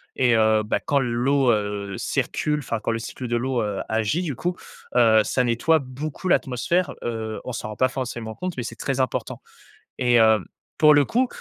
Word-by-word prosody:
Et 120 -2 +3
heu, 110 -1 +4
bah, 105 - -1
quand 140 -1 +1
l'eau, 125 +1 +2
heu, 105 -2 -2
circule, 150 0 -1
enfin 115 -5 -3
quand 115 - -2
le 115 - -2
cycle 125 +2 -6
de 120 - -1
l'eau, 125 0 0
heu, 105 -2 -3
agit 110 - 0
du 150 -8 -3
coup, 175 +6 -2 0.4
heu, 110 -3 +6
ça 125 - +1
nettoie 125 +7 +2
beaucoup 140 +7 -6
l'atmosphère, 170 +8 +1
heu, 110 -2 -4
on 125 - -5
s'en 110 - -5
rend 105 - -7
pas 130 +3 +2
forcément 120 -4 -5
compte, 180 +5 -4
mais 125 - -3
c'est 115 - -6
très 135 -1 -2
important, 130 - -3 0.6
et 120 -1 +3
heu, 110 -1 +5 0.4
pour 150 -1 +7
le 145 -1 +5
coup, 250 - +1
120 Hz, 200 wpm, -23 LUFS, 110-140 Hz, 0.6 s, pour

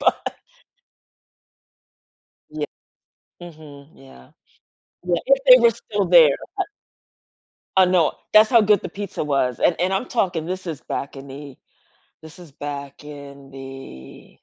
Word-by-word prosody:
Bu - - -6 2.5
Ye 145 - -1 0.8
Mhm. 150 -3 -14 0.2
Yeah. 65 - -17 0.7
Ye 175 -1 +1
if 275 +1 +4
they 255 -1 +10
were 235 - +6
still 205 -2 -2
there 165 -5 +6 0.2
bu 385 - +1 1.1
I 190 - +7
know. 180 -3 +2 0.2
That's 215 0 +6
how 235 -3 +6
good 210 -2 +3
the - - -6
pizza 200 +2 -6
was, 135 -4 -1
and 170 - +2
and 185 +2 +1
I'm 195 +6 -1
talking 180 -8 -1
this 185 +1 -5
is 160 -5 -5
back 140 - -5
in 135 +1 -10
the 140 -1 -10 0.7
this 160 +2 -14
is 170 -5 -14
back 140 0 -8
in 140 -2 -11
the 135 - -11
155 Hz, 135 wpm, -21 LUFS, 140-185 Hz, 2.5 s, they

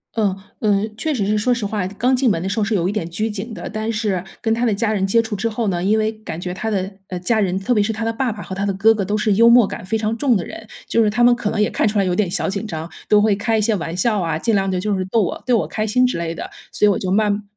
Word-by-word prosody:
嗯。 205 -4 +1 0.3
嗯， 210 +1 +1
确 315 - -1
实 215 -8 -1
是 210 +1 +1
说 250 +4 +1
实 235 -3 -2
话， 200 -2 -2
刚 245 +7 +1
进 255 -1 +2
门 170 -6 0
的 190 - -2
时 215 +3 -1
候 - - +2
是 210 +1 0
有 180 -2 +1
一 - - 0
点 205 -6 -3
拘 215 +6 -2
谨 210 +3 -6
的， - - -6
但 215 +1 -3
是 210 -5 -1 0.2
跟 225 -1 +1
他 230 +2 -1
的 225 - +2
家 220 +1 0
人 195 -2 0
接 230 +4 +3
触 220 -2 -4
之 230 +3 -1
后 225 0 -2
呢， 175 -1 -1
因 210 +3 +3
为 215 0 +1
感 215 -7 -8
觉 180 0 -4
他 220 +4 -3
的， 195 -2 -1 0.2
呃， 180 -1 -5
家 220 +5 +1
人， 190 -3 +1
特 195 +6 0
别 210 - +3
是 225 - -1
他 225 +1 -4
的 225 - +1
爸 245 +1 -1
爸 210 -1 -7
和 190 - -7
他 195 +1 -3
的 200 - +1
哥 215 +4 +4
哥 210 -3 -2
都 205 +3 0
是 210 -1 +2
幽 230 +3 +6
默 240 -1 +7
感 - - -6
非 220 +3 0
常 215 +1 -1
重 255 -3 +2
的 175 - -4
人， 220 - -9 0.2
就 230 - +3
是 210 - +3
他 240 +3 +1
们 240 0 +6
可 210 -3 -2
能 210 - -2
也 210 - +3
看 - - +1
出 210 0 -1
来 195 - +3
有 180 - 0
点 190 0 +1
小 180 - -1
紧 200 +3 -3
张， 160 -3 -5 0.2
都 210 - +6
会 210 -2 +3
开 220 +2 0
一 - - +1
些 220 0 +2
玩 170 -2 -4
笑 210 0 +1
啊， 165 -2 -1
尽 225 +7 0
量 195 -1 +1
地 185 - -1
就 205 +1 -1
是 185 - -1
逗 220 +4 +1
我 - - -4
逗 245 -2 +4
我 - - -1
开 215 0 -2
心 250 +4 +3
之 250 - 0
类 165 0 -3
的。 - - -6 0.2
所 210 - +2
以 - - +6
我 200 - +1
就 185 - -3
慢 210 +1 +1
210 Hz, 360 characters per minute, -20 LUFS, 195-225 Hz, 0.3 s, 默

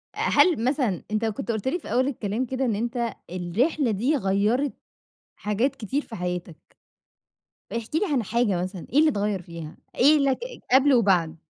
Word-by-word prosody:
آآ، - - -8
هل 330 -11 +3
مثلًا، 250 - 0
أنت 215 +1 0
كنت 220 0 -2
قُلت 220 +1 -3
لي 350 +7 0
في - - -9
أول 255 +3 +2
الكلام 230 -2 -2
كده 260 +2 -2
إن 230 -4 0
أنت 235 +1 -2 0.2
الرحلة 225 - 0
دي 240 +9 +1
غيّرِت 215 +5 +1 0.6
حاجات 230 +7 -1
كتير 270 +5 -2
في 225 - -9
حياتك، 180 -2 -4 1.2
احكِ 230 +4 -5
لي 320 - +3
عن 255 -5 +2
حاجة 210 -4 0
مثلًا، 185 -1 -6
إيه 275 - +3
اللي 310 0 +6
اتغيّر 205 -5 -1
فيها، 165 -2 -9 0.2
إيه 295 +4 +5
اللي 275 -2 +3
ك - - -15 0.4
قبْل 275 +1 +6
وبَعد؟ 180 -8 +3
230 Hz, 175 wpm, -25 LUFS, 195-265 Hz, 1.2 s, اللي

